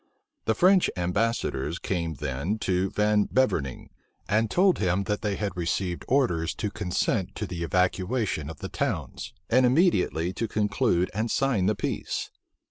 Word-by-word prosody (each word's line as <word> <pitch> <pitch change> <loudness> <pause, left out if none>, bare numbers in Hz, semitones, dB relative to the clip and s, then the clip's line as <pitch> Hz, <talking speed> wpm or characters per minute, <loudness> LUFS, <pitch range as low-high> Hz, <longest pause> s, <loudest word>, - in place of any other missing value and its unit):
The 110 - +2
French 185 - +5
ambassadors 90 - -1
came 85 -5 -2
then 70 - -2
to 95 +1 +1
Van 105 0 +2
Beverning, 80 - 0 0.4
and 110 +2 +2
told 185 - +3
him 95 0 +1
that 105 +1 -2
they 105 -3 -1
had 100 -2 -3
received 90 +1 -2
orders 105 - +1
to 105 - -3
consent 90 -4 -1
to - - -3
the 85 -2 -6
evacuation 90 - 0
of 80 - -9
the - - -5
towns, - - -3 0.2
and 130 +2 +4
immediately 125 - +2
to 115 - -2
conclude 105 -3 +1
and 110 +3 -1
sign 120 -9 +1
the 105 - +2
peace. - - -3
100 Hz, 150 wpm, -26 LUFS, 90-115 Hz, 0.4 s, French